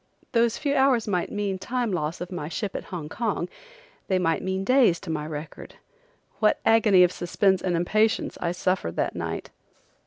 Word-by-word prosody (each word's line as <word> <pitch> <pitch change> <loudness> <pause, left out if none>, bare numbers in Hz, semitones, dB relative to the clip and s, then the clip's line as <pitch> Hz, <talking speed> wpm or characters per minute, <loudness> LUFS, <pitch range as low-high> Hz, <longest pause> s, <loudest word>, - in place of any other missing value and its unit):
Those 235 -1 +2
few 285 -2 -1
hours 265 -5 +3
might 180 -4 -1
mean 200 -2 -2
time 240 +3 -2
loss 165 -1 -2
of 180 - -5
my 170 -4 -4
ship 195 +3 -4
at - - -4
Hong 170 -5 -6
Kong; 205 -1 -2 0.6
they 190 - +2
might 165 -3 +1
mean 190 0 -2
days 245 -7 +4
to 185 - -5
my 150 -1 -3
record. 155 0 -8 0.6
What 215 -1 +3
agony 215 -5 +6
of 180 - +4
suspense 190 +1 +1
and 180 -2 0
impatience 215 +6 +1
I 170 - 0
suffered 180 - -1
that - - -1
night! - - -4
190 Hz, 180 wpm, -25 LUFS, 175-220 Hz, 0.6 s, agony